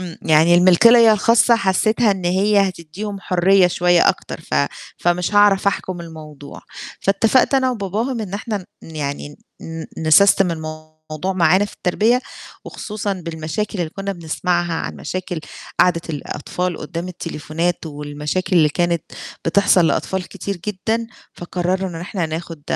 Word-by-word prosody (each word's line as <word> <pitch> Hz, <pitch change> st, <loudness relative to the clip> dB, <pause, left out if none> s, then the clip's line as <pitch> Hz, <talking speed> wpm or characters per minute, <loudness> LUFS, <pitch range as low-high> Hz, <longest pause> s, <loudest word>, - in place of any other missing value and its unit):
إمم. 175 Hz, -3 st, -8 dB
يعني 160 Hz, +2 st, +4 dB
الملكية 220 Hz, +6 st, +6 dB
الخاصة 230 Hz, +3 st, +4 dB
حسيتها 215 Hz, +2 st, +2 dB
إن 190 Hz, -3 st, -2 dB
هي 195 Hz, +2 st, +3 dB
هتدّيهم 190 Hz, +4 st, -7 dB
حرية 185 Hz, +1 st, +3 dB
شوية 175 Hz, 0 st, +3 dB
أكتر، -, -, -2 dB
ف -, -, -6 dB, 0.4 s
فمش 175 Hz, +3 st, 0 dB
هاعرف 205 Hz, -1 st, +4 dB
أحكم 185 Hz, -2 st, -1 dB
الموضوع، 155 Hz, -4 st, -11 dB, 0.4 s
فاتفقت 225 Hz, +8 st, +2 dB
أنا 260 Hz, -1 st, +2 dB
وباباهم 225 Hz, +3 st, -3 dB
إن 200 Hz, -3 st, -5 dB
إحنا 210 Hz, +1 st, -3 dB, 0.3 s
ن 160 Hz, -, -11 dB
يعني 145 Hz, 0 st, -5 dB, 0.2 s
ن 165 Hz, 0 st, -7 dB
نسستم 180 Hz, +4 st, +5 dB
الموضوع 155 Hz, +1 st, -6 dB
معانا 185 Hz, +2 st, +3 dB
في 205 Hz, -, -9 dB
التربية، 220 Hz, +7 st, +1 dB, 0.4 s
وخصوصًا 210 Hz, -1 st, -4 dB
بالمشاكل 170 Hz, +3 st, -4 dB
اللي 170 Hz, -3 st, -2 dB
كنا 195 Hz, +2 st, -4 dB
بنسمعها 175 Hz, 0 st, -2 dB
عن -, -, -4 dB
مشاكل 180 Hz, -2 st, -5 dB, 0.4 s
قعدة 170 Hz, -2 st, +3 dB
الأطفال 175 Hz, +3 st, -4 dB
قُدّام 170 Hz, +4 st, -5 dB
التليفونات 165 Hz, 0 st, -3 dB
والمشاكل 150 Hz, +5 st, -3 dB
اللي 155 Hz, -2 st, +5 dB
كانت 170 Hz, +2 st, 0 dB, 0.4 s
بتحصل 185 Hz, 0 st, +4 dB
لأطفال 190 Hz, +2 st, -1 dB
كتير 200 Hz, -2 st, -5 dB
جدًا، 220 Hz, +3 st, -2 dB, 0.3 s
فقرَّرنا 180 Hz, +2 st, -2 dB
إن -, -, -7 dB
إحنا 175 Hz, -1 st, -3 dB
ناخد 160 Hz, -1 st, -6 dB
180 Hz, 135 wpm, -19 LUFS, 165-200 Hz, 0.4 s, الملكية